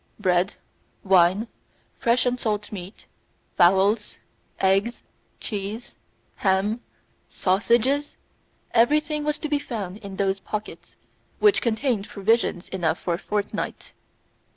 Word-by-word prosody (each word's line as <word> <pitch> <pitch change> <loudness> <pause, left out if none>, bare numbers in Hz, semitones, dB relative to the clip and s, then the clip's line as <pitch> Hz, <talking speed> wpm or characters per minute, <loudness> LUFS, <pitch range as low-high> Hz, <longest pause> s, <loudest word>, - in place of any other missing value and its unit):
Bread, 185 -1 +2 0.5
wine, 190 +3 +4 0.5
fresh 235 +1 +2
and 250 0 0
salt 210 -2 -2
meat, 190 0 -8 0.5
fowls, 195 +4 +3 0.4
eggs, 195 +5 +1 0.4
cheese, 210 +3 -5 0.4
ham, 200 +4 +1 0.5
sausages 240 +9 +1 0.6
everything 300 +5 +3
was 300 0 0
to 310 - -4
be 295 -1 +1
found 205 -9 -5
in 200 -2 -9
those 195 0 0
pockets, 215 +2 -6 0.4
which 420 -1 +4
contained 230 -2 0
provisions 200 -3 +1
enough 170 -3 0
for 175 - -2
a 170 - -2
fortnight. 205 0 -3
210 Hz, 105 wpm, -24 LUFS, 190-240 Hz, 0.6 s, wine